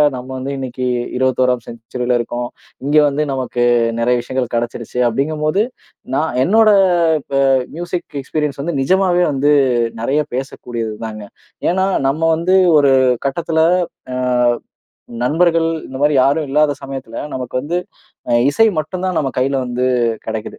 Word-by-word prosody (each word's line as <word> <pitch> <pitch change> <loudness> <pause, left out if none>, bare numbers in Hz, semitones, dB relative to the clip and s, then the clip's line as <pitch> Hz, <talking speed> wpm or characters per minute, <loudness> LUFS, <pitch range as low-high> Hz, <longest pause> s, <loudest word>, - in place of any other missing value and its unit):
நம்ம 125 +1 -8
வந்து 130 +2 -4
இன்னைக்கு 130 -1 -4 0.3
21ஆம் 125 -2 +1
செஞ்சுரில 120 +2 -3
இருக்கோம். 120 +1 -3 0.4
இங்க 145 +2 +2
வந்து 145 +2 0
நமக்கு 130 -2 -2 0.4
நெறைய 125 +1 +2
விஷயங்கள் 130 +1 -2
கிடச்சிருச்சு 120 +1 -3
அப்டிங்கும் 145 +6 -1
போது, 190 +7 +2 0.5
நான் 150 -4 -1
என்னோட 220 +5 +4 0.5
இப்ப 135 -1 -1 0.3
மியூசிக் 175 -3 -5
எக்ஸ்பீரியன்ஸ் 145 -1 -3
வந்து 160 -1 -2
நிஜமாவே 180 +3 +2
வந்து 145 +2 +2 0.5
நெறைய 140 +6 +1
பேசக்கூடியதுதாங்க. 115 -4 -5 0.5
ஏன்னா 190 +2 +1 0.2
நம்ம 150 +4 -1
வந்து 175 +4 +1 0.2
ஒரு 140 -2 +4 0.3
கட்டத்துல, 160 +2 0 0.5
அ 125 - -2 1.1
நண்பர்கள் 165 +2 +2 0.2
இந்த 130 0 -7
மாதிரி 150 0 +3
யாரும் 145 +1 +1
இல்லாத 150 +1 +3
சமயத்துல 135 -4 -7 0.2
நமக்கு 125 -2 -7
வந்து 170 +4 -1 0.5
அ - - +3 0.2
இசை 225 0 +4
மட்டும்தான் 185 +2 -3
நம்ம 135 -2 -1
கையில 135 +1 +1
வந்து 125 +1 -1 0.4
கிடைக்குது. 110 -1 -5
135 Hz, 130 wpm, -17 LUFS, 125-160 Hz, 1.1 s, என்னோட